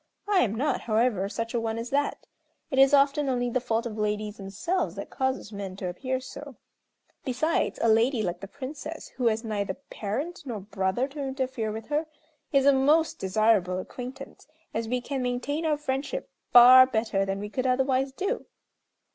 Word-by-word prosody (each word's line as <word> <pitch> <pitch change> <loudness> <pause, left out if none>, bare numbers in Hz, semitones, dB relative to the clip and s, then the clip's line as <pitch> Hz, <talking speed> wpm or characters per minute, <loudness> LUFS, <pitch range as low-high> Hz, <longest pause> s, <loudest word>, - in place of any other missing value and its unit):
I 410 -2 +3
am 220 - +1
not, 275 +6 0
however, 215 -3 +1
such 230 +1 -4
a 240 - +1
one 225 0 -2
as 230 +1 -5
that. 285 +1 0 0.5
It 265 - +1
is 270 +1 +7
often 280 0 +3
only 245 -1 0
the 255 - 0
fault 230 -1 -1
of 220 -2 -5
ladies 210 0 -2
themselves 205 - -2
that - - -7
causes 260 -5 -2
men 195 -2 -5
to 190 -1 -4
appear 260 +8 -2
so; 275 +1 -9 0.7
besides 290 +5 0
a - - +4
lady, 225 +2 +3
like 175 -2 -2
the 195 - -8
Princess, 295 +6 -7
who 250 -2 -1
has 225 +1 +1
neither 205 -4 -2
parent 275 +6 -5
nor 240 -6 -5
brother 195 +4 -1
to 290 +2 -9
interfere 260 -5 -2
with 220 +3 -7
her, 305 +2 0 0.4
is 275 -1 +3
a 280 - +7
most 300 +5 +3
desirable 190 -2 +2
acquaintance, 255 +9 -8 0.3
as 225 0 -2
we 250 0 0
can 270 +1 -3
maintain 255 +6 -1
our 300 -1 +2
friendship 290 - -3 0.2
far 255 +1 +10
better 220 -5 0
than 195 0 -2
we 205 +1 -5
could 260 +1 -1
otherwise 265 +1 +1
do." 395 - -3
250 Hz, 180 wpm, -27 LUFS, 215-275 Hz, 0.7 s, far